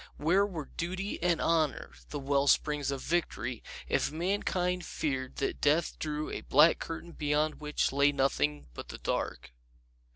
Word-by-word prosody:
Where 185 +6 +3
were 160 -7 -7
Duty 185 +3 -3
and 175 -1 +2
Honor, 160 -4 +1 0.2
the 150 - -4
well 140 0 +1
springs 150 -1 +2
of 135 -2 -3
Victory, 130 -8 -1 0.3
if - - +1
mankind 180 +1 0
feared 130 -5 -3
that 135 - -2
death 160 +3 +2
drew 150 0 -3
a - - -4
black 150 +5 +5
curtain 165 +1 -6
behind 150 0 0
which 150 0 0
lay 140 +1 +4
nothing 75 - 0
but - - -8
the - - -7
dark? - - -3
150 Hz, 155 wpm, -30 LUFS, 140-170 Hz, 0.3 s, black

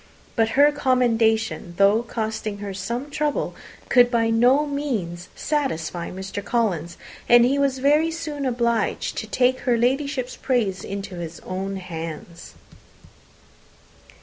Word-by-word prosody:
But 225 -2 +2
her 290 +1 +7
commendation, 230 -9 +1
though 200 +3 +5
costing 220 -3 -4
her 200 -1 -6
some 235 +9 -4
trouble, 295 0 -1 0.3
could 245 -1 +5
by 230 -2 +1
no 250 +6 +4
means 225 - -3
satisfy 175 - -2
Mr. 190 +2 -6
Collins, 195 -9 -1 0.3
and 240 0 +7
he 275 +3 +2
was 275 -2 +1
very 295 +5 +3
soon 300 -4 -4
obliged 235 -3 0
to 220 - -6
take 255 +3 +2
her 245 -2 +1
Ladyship's 255 +1 0
praise 220 -8 0
into 195 -1 -6
his 170 -1 -6
own 195 +1 -4
hands. 165 -2 -7
235 Hz, 125 wpm, -23 LUFS, 195-265 Hz, 0.3 s, her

